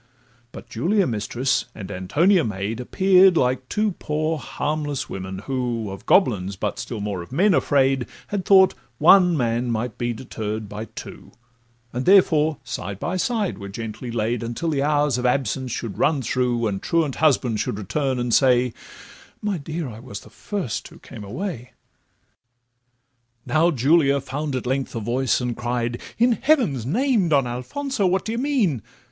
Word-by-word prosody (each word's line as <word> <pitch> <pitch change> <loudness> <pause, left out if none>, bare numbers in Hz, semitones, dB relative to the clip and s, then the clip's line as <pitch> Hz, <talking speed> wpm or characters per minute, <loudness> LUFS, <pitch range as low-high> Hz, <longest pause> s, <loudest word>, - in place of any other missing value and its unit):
But 120 - -11
Julia 180 - +1
mistress, 120 +3 -1
and 100 -3 -7
Antonia 160 - +2
maid, 105 +2 -3
Appear'd 185 +6 +4
like 130 -1 0
two 215 0 +1
poor 155 +1 -1
harmless 145 -1 -3
women, 95 0 -6
who 120 -5 -2
Of 95 - -10
goblins, 100 - +3
but 105 +4 -3
still 115 -1 -5
more 100 -3 -3
of 85 - -11
men 185 +8 +3
afraid, 135 -5 +2 0.2
Had 200 -2 -2
thought 190 -1 +6 0.2
one 180 +2 +6
man 120 -1 0
might 115 0 -3
be 120 0 0
deterr'd 110 -2 -5
by 105 +2 -6
two, - - -11 0.6
And 125 +5 -3
therefore 160 -6 +5
side 95 +2 -5
by 180 - -2
side 210 - -1
were 100 0 -7
gently 115 +3 -6
laid, 115 0 -1
Until 120 +8 -3
the 140 -2 0
hours 145 -3 +2
of 125 - +1
absence 130 0 -1
should 115 -4 -5
run 150 -4 +2
through, 120 -1 0
And 100 -3 -2
truant 160 -5 0
husband 125 -8 +2
should - - -2
return, 130 +6 -1
and 120 -1 -1
say, 125 -2 +4 0.7
'My 205 -4 -2
dear, 155 +2 -4
I 110 -3 -9
was 115 -5 -8
the - - -16
first 190 - -4
who - - -15
came 105 - -11
away.' 125 - -6 1.7
Now 155 +6 +3
Julia 140 0 +3
found 140 +1 -4
at 125 - -3
length 130 +1 -2
a - - -1
voice, 120 +4 0
and 125 -2 -2
cried, 120 0 -2 0.2
'In 240 +2 +4
heaven's 235 - +2
name, 225 - +2
Don 140 -4 +3
Alfonso, 195 - -2
what 185 +1 0
d' - - -4
ye 230 - -2
mean? 240 - +1
130 Hz, 165 wpm, -23 LUFS, 115-165 Hz, 1.7 s, thought